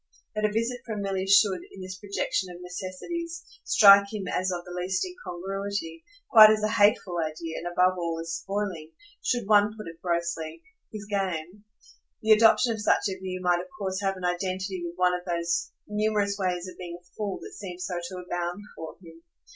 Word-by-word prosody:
That 215 0 0
a 210 - +1
visit 230 +3 -1
from 215 -3 -4
Milly 195 -1 -2
should, 200 -1 +5
in 190 - -10
this 185 0 -7
projection 200 -1 -2
of 175 0 -9
necessities, 320 - -6 0.2
strike 200 -1 +7
him 210 -3 -4
as 185 +1 0
of 175 -1 -4
the 180 - -10
last 180 - -1
incongruity, 195 - -5 0.2
quite 220 -5 +10
as 215 0 +2
a 215 - +2
hateful 205 -5 +3
idea, 160 0 -3
and 175 - -5
above 180 +1 +2
all 165 -1 -2
as 165 0 -4
spoiling, 180 -3 -4 0.3
should 245 -4 0
one 210 0 +4
put 215 - -7
it 165 0 -10
grossly, 170 - -2 0.3
his 210 -1 -7
game 195 -1 -3 0.6
the 220 - +3
adoption 225 +2 +6
of 220 - -5
such 210 - +3
a 190 -1 -5
view 185 -1 -5
might 175 -1 +3
of - - -10
course 190 -1 -2
have 195 -1 0
an 180 - -5
identity 185 +1 -2
with 170 0 -5
one 180 0 +3
of 180 0 -3
those 170 -1 -1 0.2
numerous 210 -1 0
ways 185 -2 -2
of 185 - -11
being 175 -1 -6
a 175 - -33
fool 205 -3 -3
that - - -9
seemed 180 -3 -8
so 180 -1 -2
to 185 +2 -6
abound 175 +1 -3 0.2
for 160 -1 -8
him. 165 -1 -14
185 Hz, 195 wpm, -27 LUFS, 175-205 Hz, 0.6 s, quite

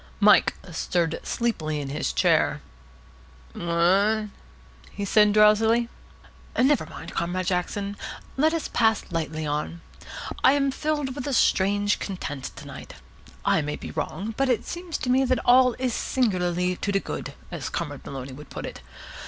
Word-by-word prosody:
Mike 210 0 +5 0.2
stirred 165 0 -1
sleepily 155 -11 -1
in 140 -2 -4
his 140 - -2
chair. - - +2 0.9
"What?" 195 +6 +2 0.6
he 200 - -5
said 210 +1 +5
drowsily. 220 +3 +4 0.7
"Never 265 - +3
mind, - - -9
Comrade 180 +2 -1
Jackson. 200 +2 -1 0.4
Let 310 +4 +3
us 330 -1 -2
pass 225 -2 +2
lightly 160 -2 -2
on. 150 +3 -3 0.6
I 260 - +7
am 275 -1 +2
filled 295 -2 -1
with 280 0 -5
a 280 - -1
strange 205 -2 +2
content 145 -8 -5
to - - -10
night. - - -10 0.5
I - - +3
may 150 0 -3
be - - -8
wrong, 215 +4 -4
but 270 +1 +1
it 235 -3 +1
seems 345 -2 -4
to 250 - -4
me 260 +1 +4
that 255 -1 +2
all 250 0 +6
is 255 -2 -1
singularly 180 -8 0
to 200 - -2
de 195 - +2
good, - - -6 0.2
as - - -4
Comrade - - -4
Maloney 135 -1 -7
would 145 +2 -11
put - - -6
it. - - -8
205 Hz, 155 wpm, -25 LUFS, 170-250 Hz, 0.9 s, I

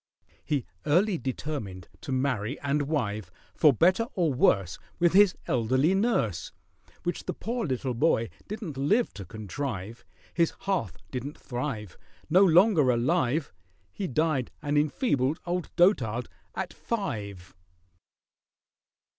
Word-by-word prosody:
He 145 -5 -1 0.2
early 180 +4 +3
determined 125 - -5
to - - -6
marry 130 -2 -1
and 140 0 0
wive, 110 - -2 0.2
For 150 - +5
better 185 - +3
or 170 -7 +2
worse 95 -8 +2 0.2
With 175 0 +3
his 200 -1 +6
elderly 130 +8 +2
nurse— 195 - 0 0.5
Which 175 - -3
the - - -3
poor 235 -2 -3
little 130 -1 -1
boy 115 -3 +2 0.2
didn't 205 - -6
live 205 - +2
to 100 -1 -8
contrive: 110 0 -5 0.3
His 170 -2 +2
hearth 145 - -1
didn't 135 +3 -5
thrive— 120 -6 -5 0.3
No 185 +4 +7
longer 175 - +5
alive, 135 - +1 0.4
He 195 - -4
died 155 -3 0
an 145 0 0
enfeebled 145 - +1
old 175 0 -2
dotard 125 - +3 0.3
at - - -4
five! 105 - -4
140 Hz, 120 wpm, -28 LUFS, 115-175 Hz, 0.5 s, No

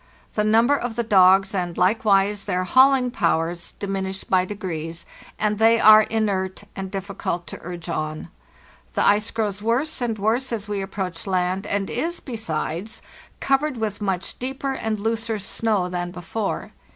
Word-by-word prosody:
The 210 - +1
number 225 +6 +4
of 245 -4 -3
the 235 - 0
dogs, 195 -2 +5
and 175 -3 -2
likewise 200 0 +2
their 185 -2 0
hauling 260 +4 +4
powers, 170 -5 0
diminish 195 -1 -4
by 185 -1 +2
degrees, 170 -5 -5 0.3
and 210 0 0
they 225 +1 +5
are 215 0 +9
inert 205 -4 -1
and 190 -1 -5
difficult 190 -3 -4
to - - -8
urge 175 0 -7
on. 155 -1 -4 0.6
The - - +1
ice 210 +2 +3
grows 210 -3 -2
worse 250 +7 0
and 230 -3 -1
worse 225 +6 0
as 220 -3 -3
we 205 -1 -2
approach 190 -2 -5
land, 185 +1 0
and 200 -1 -1
1s, 335 +8 -3
besides, 210 - -3 0.4
covered 275 0 +1
with 215 -2 -3
much 190 -3 -2
deeper 270 +2 -2
and 220 -4 -2
looser 225 +1 -1
snow 205 -1 0
than 175 -1 -3
before. 185 +4 -4
205 Hz, 155 wpm, -23 LUFS, 185-225 Hz, 0.6 s, are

